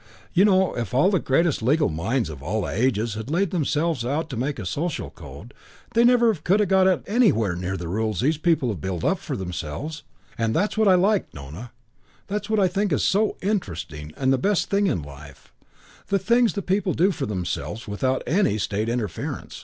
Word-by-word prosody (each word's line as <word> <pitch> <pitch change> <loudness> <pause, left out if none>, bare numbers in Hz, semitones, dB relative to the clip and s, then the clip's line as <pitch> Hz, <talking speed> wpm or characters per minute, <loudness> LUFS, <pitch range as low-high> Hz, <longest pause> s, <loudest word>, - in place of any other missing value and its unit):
You 185 +3 +5
know, 190 -2 +3
if 120 -2 -3
all 150 +9 +4
the 190 - +2
greatest 155 +2 +1
legal 145 +8 +3
minds 95 +7 -1
of 70 -3 -10
all 100 +8 -2
the - - -3
ages 115 0 0
had 110 +3 -6
laid 175 +4 +1
themselves 160 -4 0
out 150 +5 -2
to - - -4
make 135 +5 -2
a 105 - -6
social 155 - -3
code 85 - -12 0.4
they 230 - +4
could 240 - +6
never 240 -2 +4
have 160 -6 -11 0.2
got 190 -1 +3
anywhere 195 - +2
near 90 +2 -3
the 85 - -6
rules 110 +2 -1
the 150 +5 +2
people 160 -7 +2
have 95 -9 -4
built 90 -2 -3
up - - +1
for - - -5
themselves. 95 - -5 0.4
And 115 -1 0
that's 205 +5 +1
what 220 -1 +3
I 190 - +7
like, 200 +3 +2
Nona 75 - -9 0.5
that's 205 +1 -4
what 220 -1 +2
I 190 - +4
think 190 -4 0
so 210 +2 +1
interesting 80 - -3
and 130 0 +2
the 130 - +1
best 200 +6 0
thing 200 0 +3
in 105 - -1
life: 70 -1 -13 0.5
the 200 - +2
things 235 +4 +2
the 200 - -3
people 190 0 0
do 185 +4 +3
for 145 -7 -4
themselves 105 +3 -4
without 130 +6 -1
any 180 - +2
State 105 +2 -1
interference. 110 -8 -4
135 Hz, 200 wpm, -24 LUFS, -, 0.5 s, I